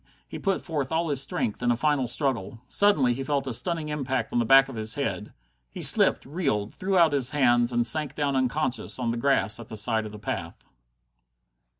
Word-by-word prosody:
He - - -8
put 195 -2 -2
forth 145 -6 -4
all 165 0 -1
his 140 -2 0
strength 115 -5 -3
in 120 - 0
a 120 - +2
final 145 -2 0
struggle. 120 -5 -2
Suddenly 150 -12 +2
he 135 +3 -5
felt 140 0 -2
a 130 - -4
stunning 160 +4 -2
impact 135 -3 -3
on 120 - +1
the 120 - 0
back 135 +3 +6
of 135 - -9
the 110 -1 -2
head. 120 -6 -4 0.4
He - - -6
slipped, - - +6
reeled, 135 - -2
threw 190 0 -2
out 165 -4 +4
his 130 -3 +1
hands, 120 -4 +2
and 120 -1 0
sank 150 +5 0
down 145 -2 -1
unconscious 130 -2 -1
on 120 -2 -2
the 120 - -4
grass 115 -5 +1
at 115 - -10
the 110 - -7
side 110 +1 +1
of - - -11
the 105 - -10
path. 105 - -6
130 Hz, 215 wpm, -25 LUFS, 115-150 Hz, 0.4 s, back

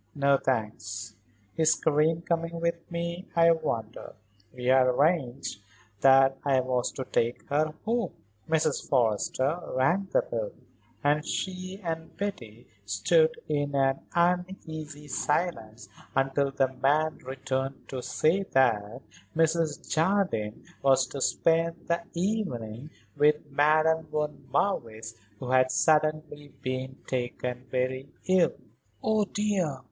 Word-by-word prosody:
"No, 140 -1 +4
thanks. 110 -3 -2 0.4
Is 160 0 +4
Karen 160 +2 +2
coming 170 0 -1
with 170 0 -2
me, 170 +1 -4
I 170 0 +6
wonder? 120 -9 -3 0.4
We 125 -1 -8
had 130 0 +5
arranged 135 - +1 0.4
that 135 +2 +5
I 135 -2 +3
was 125 -1 -1
to 130 - -5
take 120 0 -1
her 155 +2 +1
home." 235 +1 0 0.4
Mrs. 155 -2 0
Forrester 130 +4 +1 0.2
rang 170 +10 +2
the - - +3
bell - - -4 0.5
and 145 +1 +2
she 185 +3 -4
and 165 -1 -5
Betty 120 - -5 0.2
stood 155 - +3
in 145 -1 -1
an 135 -1 +2 0.2
uneasy 170 -4 -1
silence 120 - -2 0.3
until 135 +1 +2
the 135 -1 0
man 150 +4 +1
returned 135 +1 -4
to 130 -2 -4
say 165 +9 +1
that 120 - +1 0.3
Mrs. 160 -1 +1
Jardine 165 - 0 0.2
was 135 -1 +4
to 140 - -6
spend 165 +4 +1
the 170 0 +1
evening 155 - -2 0.3
with 150 0 +2
Madame 155 +3 +3
von 150 -2 -3
Marwitz 115 - -1 0.2
who 125 +4 -5
had 130 0 +4
suddenly 155 -1 +1
been 130 0 -3
taken 125 0 -3
very 130 +2 -2 0.2
ill. 185 -3 +3 0.5
"Oh, 215 -1 +2
dear! 200 -9 -1
145 Hz, 120 wpm, -28 LUFS, 130-165 Hz, 0.5 s, I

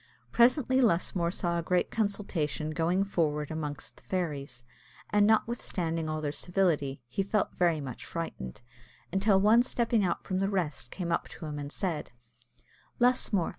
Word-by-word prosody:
Presently 260 +2 +4
Lusmore 175 -5 +2
saw 170 -1 -1
a - - -1
great 180 +2 +1
consultation 195 -8 -1
going 170 +4 +1
forward 150 -6 -1
among 150 -2 -3
the - - -10
fairies, 145 -9 -3 0.5
and, 205 0 +5
notwithstanding 175 -8 0
all 155 0 -2
their 145 -1 -1
civility, 150 -7 0
he 125 +11 -1
felt 200 +2 0
very 170 -3 +2
much 130 -4 -6
frightened, 140 - -5 0.5
until 195 +1 +3
one 215 +4 +6
stepping 235 -3 +1
out 180 - -1
from 185 -1 -2
the 195 0 +1
rest 170 - -2
came 175 +2 -4
up - - 0
to - - -9
him 150 -1 -4
and 145 0 -6
said 170 -5 -2 0.9
"Lusmore! 240 -7 +3
175 Hz, 155 wpm, -30 LUFS, 155-200 Hz, 0.9 s, one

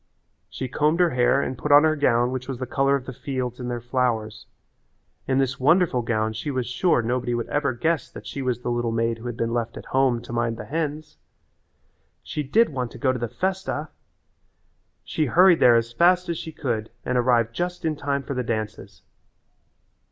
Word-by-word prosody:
She 130 - -5
combed 150 +6 +1
her 175 -2 +4
hair 125 +2 +3
and 130 - -3
put 145 +4 -3
on 145 +1 +8
her 155 0 +3
gown 120 -4 +2
which 130 0 -4
was 135 -2 -4
the 130 - -4
colour 135 +2 +2
of 135 -2 -4
the 130 - -7
fields 125 -1 -4
and 125 - -5
all - - -3
their 120 -1 -3
flowers. 115 -4 -1 0.8
In 130 - +1
this 135 0 0
wonderful 150 -1 +3
gown 110 -2 -1
she 110 +7 -4
was 130 -3 -1
sure 125 +1 +1
nobody 120 +1 -1
would 120 - -3
ever 145 -2 +1
guess 160 +6 -1
that - - -11
she 140 - -5
was 125 -2 -1
the 120 - -2
little 120 -1 -1
maid 115 0 0
who 120 - -7
had 120 -1 -5
been 115 0 -1
left 120 -1 -2
at - - -9
home 130 -3 +3
to - - -8
mind 115 -1 -1
the 105 - -7
hens. 155 - -4 1.1
She 150 - -4
did 210 - +3
want 125 -5 -3
to - - -9
go 130 -2 +1
to 125 - -4
the 120 - -2
festa! 185 - -2 1.1
She 155 - -1
hurried 180 +4 +5
there 120 -1 +6
as 115 0 0
fast 180 +5 +3
as 170 - -1
she 160 - -7
could 120 -8 -3 0.2
and 125 - -1
arrived 120 -2 +2
just 175 +4 -3
in 155 -1 0
time 140 -1 -2
for 140 - -4
the 125 - -1
dances. 110 -3 -5
130 Hz, 210 wpm, -24 LUFS, 120-150 Hz, 1.1 s, on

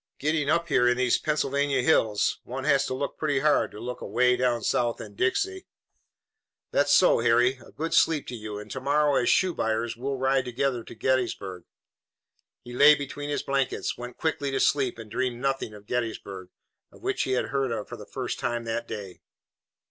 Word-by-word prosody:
Getting 150 -1 0
up 170 +2 +2
here 125 -2 +3
in 125 0 +3
these 130 -1 +2
Pennsylvania 140 -3 0
hills, 110 -8 +2
one 130 +2 -6
has 140 -2 +3
to 130 - -3
look 140 +2 -4
pretty 145 -3 0
hard 150 0 +3
to 105 - -11
look 125 +2 -6
away 125 +1 +2
down 120 -3 0
South 120 -1 0
in - - -9
Dixie." 380 +1 -1 1.0
"That's 145 0 +2
so, 160 0 +5
Harry. 120 +3 +3
A - - -16
good 165 +2 -4
sleep 155 -3 +3
to 125 - -5
you, 105 -2 -6
and 105 0 -9
to 130 - -5
morrow, 145 +2 +2
as 120 - +1
shoe 185 -2 +3
buyers, 115 -2 -1
we'll 135 +3 -3
ride 130 0 +1
together 125 0 -1
to - - -11
Gettysburg." 110 -7 -1 1.0
He 120 - -10
lay 145 +4 +7
between 145 0 -6
his 145 - -2
blankets, 135 -1 -1
went 125 0 -8
quickly 150 -3 -1
to 135 0 -1
sleep 135 -5 +2
and 110 -2 -10
dreamed 125 -2 -1
nothing 135 -3 -1
of 105 0 -14
Gettysburg, 100 -6 -4 0.4
of - - -18
which - - -1
he 130 - 0
had 125 - 0
heard 130 -6 -2
for - - -7
the - - -11
first - - -4
time 120 -1 -2
that 115 +1 -3
day. 100 -4 -7
130 Hz, 195 wpm, -26 LUFS, 120-145 Hz, 1.0 s, lay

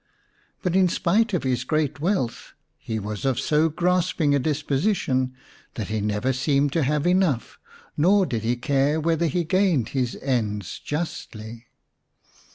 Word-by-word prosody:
But 180 -2 0
in 190 -1 +5
spite 210 +6 +1
of 180 - -1
his 125 -2 0
great 150 0 -1
wealth 160 - -2 0.3
he 110 - -4
was 105 0 -5
of 135 -3 +1
so 155 +1 +2
grasping 175 -2 +1
a 140 - +3
disposition 140 -2 0 0.4
that 110 -3 -4
he 110 -1 -1
never 105 +5 0
seemed 140 +2 +1
to 165 - +2
have 150 +2 0
enough, 180 -9 +1 0.4
nor 190 +6 +4
did 115 -9 -2
he 115 +3 0
care 140 +4 +1
whether 165 +1 +1
he 175 +3 0
gained 175 - +2
his 125 -3 -2
ends 105 - -2
justly. 115 -7 -6
145 Hz, 150 wpm, -24 LUFS, 120-170 Hz, 0.4 s, in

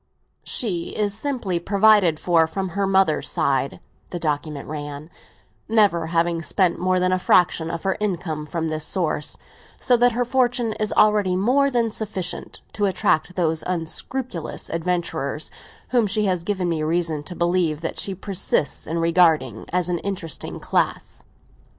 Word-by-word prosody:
"She 180 -8 -2
is 205 -2 0
amply 240 -11 -1
provided 200 -5 +4
for 165 -2 +3
from 190 +3 -3
her 195 +2 -1
mother's 190 -5 +2
side," 135 0 0 0.3
the 175 - -4
document 150 -2 -3
ran, 145 +1 -6 0.6
"never 200 -7 +3
having 165 0 +1
spent 180 +1 +1
more 185 0 +2
than 185 0 +2
a 185 - +2
fraction 175 -3 +3
of 165 -1 -4
her 190 -1 0
income 175 -7 -2
from 165 0 -2
this 155 -1 -2
source; 155 -3 -2 0.4
so 250 - +3
that 245 0 +4
her 245 +1 0
fortune 245 -2 +1
is 215 -1 -1
already 210 -3 +3
more 255 +9 +3
than 235 -4 +1
sufficient 195 -5 -4
to 205 -2 +1
attract 180 -2 +1
those 160 -3 0
unscrupulous 180 - -4
adventurers 165 -4 -2 0.4
whom 240 -4 +3
she 210 +1 +1
has 180 -3 0
given 185 -1 -1
me 165 -2 -1
reason 160 -1 0
to 175 +4 -8
believe 170 -3 +1
that 165 - -3
she 195 - 0
persists 185 -5 -1
in 165 +2 -2
regarding 165 - +2
as 180 -1 +1
an 175 -1 -1
interesting 180 -7 -4
class." - - -1
180 Hz, 155 wpm, -23 LUFS, 160-205 Hz, 0.6 s, provided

